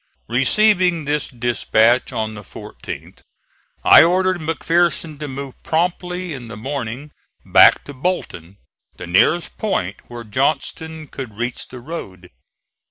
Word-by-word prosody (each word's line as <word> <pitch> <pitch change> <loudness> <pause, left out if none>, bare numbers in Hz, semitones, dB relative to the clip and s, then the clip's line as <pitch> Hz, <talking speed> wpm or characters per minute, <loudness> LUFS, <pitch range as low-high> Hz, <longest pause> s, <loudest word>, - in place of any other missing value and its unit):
Receiving 180 - +3
this 145 +1 0
dispatch 120 -1 +2
on 110 0 -3
the 105 - -8
14th 100 - -10 0.7
I - - +9
ordered 185 +1 +2
McPherson 165 -1 0
to 150 - -4
move 135 -1 -7
promptly 180 +1 -2
in 125 -4 -8
the 115 -2 -8
morning 135 +3 -5 0.3
back - - +6
to 145 - -10
Bolton, 100 - -4 0.4
the - - -7
nearest 95 - +2
point 105 - -1
where 120 -1 -8
Johnston 155 +7 -2
could 130 -8 -8
reach 120 +1 -3
the 125 - -10
road. 95 - -8
140 Hz, 125 wpm, -20 LUFS, 115-170 Hz, 0.7 s, I